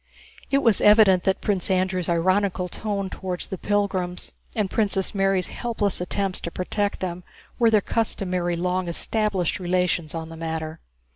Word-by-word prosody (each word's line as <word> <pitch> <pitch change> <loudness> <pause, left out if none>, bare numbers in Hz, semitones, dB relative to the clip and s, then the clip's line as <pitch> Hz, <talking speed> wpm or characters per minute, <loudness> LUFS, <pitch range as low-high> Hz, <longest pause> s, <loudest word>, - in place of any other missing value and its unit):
It 275 0 +2
was 225 -4 +4
evident 210 -4 +6
that 190 - +1
Prince 195 -3 +1
Andrew's 185 -2 0
ironical 185 +2 +1
tone 200 +1 -3
toward 180 -2 -4
the 190 - -4
pilgrims 190 -3 -1 0.2
and 210 -3 +1
Princess 195 -2 0
Mary's 195 -2 +1
helpless 215 -6 -1
attempts 195 +1 -1
to - - -3
protect 200 +4 -2
them 180 -1 -4 0.4
were 230 -1 +5
their 215 -2 +4
customary 185 -6 -1
long 180 +1 -1
established 195 0 0
relations 180 -3 0
on 160 0 -5
the 165 - -9
matter. 160 0 -4
185 Hz, 150 wpm, -24 LUFS, 180-205 Hz, 0.4 s, evident